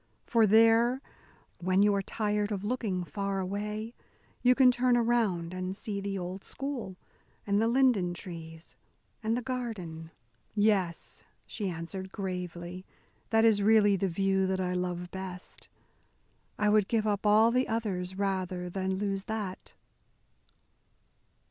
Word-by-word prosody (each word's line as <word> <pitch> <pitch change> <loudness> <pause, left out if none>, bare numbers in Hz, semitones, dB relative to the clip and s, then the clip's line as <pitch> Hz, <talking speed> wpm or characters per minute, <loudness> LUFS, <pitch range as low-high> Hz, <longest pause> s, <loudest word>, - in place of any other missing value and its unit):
For 230 -2 +4
there, 225 +4 +5 0.6
when 185 +2 +3
you 205 0 +4
are 200 - +1
tired 210 +1 -1
of 200 -2 -3
looking 210 -5 -1
far 195 +2 -3
away, 210 +4 -4 0.5
you 250 0 +5
can 255 -1 +6
turn 245 0 +2
around 220 -8 +1
and 185 +1 -4
see 205 -3 -4
the 195 0 -3
old 185 +1 -5
school, 260 -9 -5 0.5
and 200 +1 +2
the 225 - +3
linden 235 -8 +3
trees, 165 -2 -9 0.5
and 225 +1 0
the 245 - -3
garden." 210 -11 -5 0.5
"Yes," 205 -5 0 0.2
she 205 -3 -3
answered 185 +3 -6
gravely, 180 -2 -5 0.5
"that 225 0 +4
is 215 -3 +4
really 205 -1 +5
the 195 +1 0
view 190 +2 +1
that 190 0 -1
I 180 -1 -1
love 180 -1 -3
best. 185 -1 -8 0.9
I 210 - +1
would 210 -1 +4
give 225 -2 +1
up 205 0 0
all 215 +2 +6
the 255 +2 +2
others 190 -5 -2
rather 185 -2 -2
than 190 0 -1
lose 195 0 -2
that." 210 -4 -5
200 Hz, 140 wpm, -30 LUFS, 185-220 Hz, 0.9 s, can